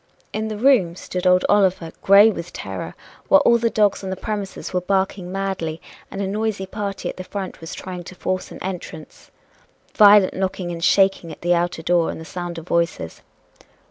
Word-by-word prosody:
In 220 0 -2
the 215 -1 -4
room 215 -9 +3
stood 180 0 -3
old 180 0 +4
Oliver, 190 -5 +2
gray 200 +3 +7
with 170 -4 -7
terror, - - -6 0.3
while 290 - +6
all 235 0 +5
the 230 0 +1
dogs 210 -3 +1
on 190 - -4
the 190 - -2
premises 200 0 -5
were 180 - +1
barking 190 -1 -1
madly, 190 -5 -3 0.3
and 200 - -4
a - - -2
noisy 210 -1 -2
party 200 0 -5
at - - -5
the 185 - -6
front 190 -1 -6
was 165 - -7
trying 180 -1 -7
to 185 - -10
force 185 +1 -3
an - - -10
entrance. 180 -4 -8 0.6
Violent 205 -2 +6
knocking 185 -2 -3
and 165 -1 -6
shaking 195 -4 +3
at - - -11
the 175 +1 +2
outer 175 -1 -1
door 175 0 +2
and - - -5
the 160 - -9
sound 175 0 -6
of 165 +1 -9
voices. 170 - -1
190 Hz, 195 wpm, -21 LUFS, 175-200 Hz, 0.6 s, gray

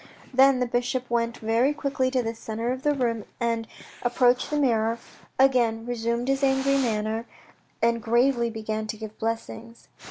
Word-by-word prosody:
" - - -23
Then 265 0 +5
the 250 - +1
bishop 245 +1 -1
went 235 0 0
very 230 +6 +1
quickly 275 -3 0
to 255 -1 0
the 225 0 -2
centre 225 +1 -4
of 255 0 -3
the 295 0 +1
room, 230 -5 -1
then 230 -1 -1 0.3
approached 245 0 +2
the 300 - -1
mirror, 230 -5 +2 0.4
again 240 -4 +3
resumed 235 0 -2
his 270 0 +1
angry 270 0 +3
manner, 225 -2 -1 0.6
and 230 0 +2
gravely 235 +2 +2
began 220 -1 -4
to 215 0 -5
give 215 0 -9
blessings. 230 +1 -5
235 Hz, 165 wpm, -26 LUFS, 225-260 Hz, 0.6 s, Then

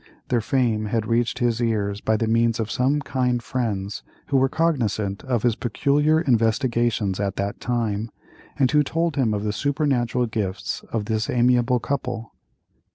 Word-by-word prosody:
Their 120 -2 +2
fame 115 -3 +1
had 110 +1 -1
reached 115 +1 0
his 120 -2 0
ears 105 -3 -1
by 110 0 +1
the 115 - 0
means 115 0 +2
of 110 -1 -2
some 140 +4 +1
kind 125 -3 0
friends 105 -6 -3 0.3
who 140 - +3
were 135 0 +3
cognisant 115 -10 0
of 125 -4 0
his 120 -2 +2
peculiar 145 +7 +2
investigations 115 - +1
at 100 -1 -1
that 100 +1 -3
time, 115 -3 -1 0.5
and 135 -3 +3
who 150 0 +5
told 165 +2 -1
him 130 -6 +2
of 105 -1 -1
the 105 -1 -1
supernatural 130 -2 0
gifts 105 -5 -3
of 110 -3 -1
this 110 0 -1
amiable 125 0 +3
old 120 - -2
couple. 125 -5 -3
120 Hz, 165 wpm, -23 LUFS, 110-130 Hz, 0.5 s, who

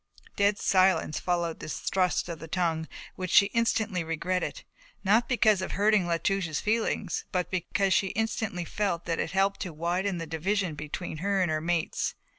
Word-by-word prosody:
Dead 200 0 +3
silence 185 -6 +3
followed 175 -2 -1
this 155 - -5
thrust 185 -2 0
of 170 -2 -6
the 165 - -8
tongue 165 -2 -1 0.3
which 185 -1 -4
she 200 - +7
instantly 220 -5 +1
regretted, 180 - -2 0.4
not 215 +4 +3
because 215 -6 +3
of 190 - -4
hurting 205 -2 +3
La 170 -1 +1
Touche's 175 -4 -1
feelings, 215 -3 -1
but 180 -1 -1
because 185 +2 +1
she 195 - +3
instantly 215 -4 -2
felt 185 -3 -2
that 165 -1 -1
it - - -1
had 190 - -6
helped 195 +1 +2
to 185 - -4
widen 175 +4 -1
the 165 - -4
division 175 +3 -1
between 150 +3 -5
her 195 +4 0
and 180 -3 +2
her 155 0 0
mates. 170 0 -1
185 Hz, 180 wpm, -28 LUFS, 170-200 Hz, 0.4 s, she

